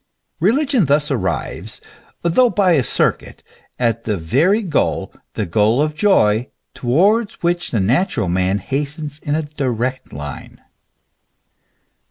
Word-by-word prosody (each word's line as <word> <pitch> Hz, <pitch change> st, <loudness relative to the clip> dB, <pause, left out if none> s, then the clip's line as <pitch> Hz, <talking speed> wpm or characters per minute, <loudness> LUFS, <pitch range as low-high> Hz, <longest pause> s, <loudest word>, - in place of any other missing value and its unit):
Religion 255 Hz, -, +2 dB
thus 145 Hz, +1 st, +1 dB
arrives, 105 Hz, -2 st, -3 dB, 0.4 s
though 235 Hz, +9 st, +4 dB
by 200 Hz, -4 st, +2 dB
a 155 Hz, -5 st, +4 dB
circuit, -, -, -1 dB, 0.3 s
at 115 Hz, -2 st, 0 dB
the 105 Hz, -2 st, -1 dB
very 155 Hz, -, +2 dB
goal, 165 Hz, -7 st, -1 dB, 0.2 s
the 110 Hz, -, -2 dB
goal 105 Hz, +7 st, +2 dB
of 150 Hz, +1 st, +1 dB
joy, 125 Hz, -, +2 dB, 0.2 s
towards 200 Hz, -, +2 dB
which 175 Hz, 0 st, 0 dB
the 115 Hz, -, 0 dB
natural 120 Hz, -, +1 dB
man 95 Hz, +2 st, +1 dB
hastens 145 Hz, -, -4 dB
in 150 Hz, -2 st, -2 dB
a 160 Hz, -, -1 dB
direct 130 Hz, -4 st, -3 dB
line. 70 Hz, 0 st, -8 dB
140 Hz, 125 wpm, -19 LUFS, 110-175 Hz, 0.4 s, though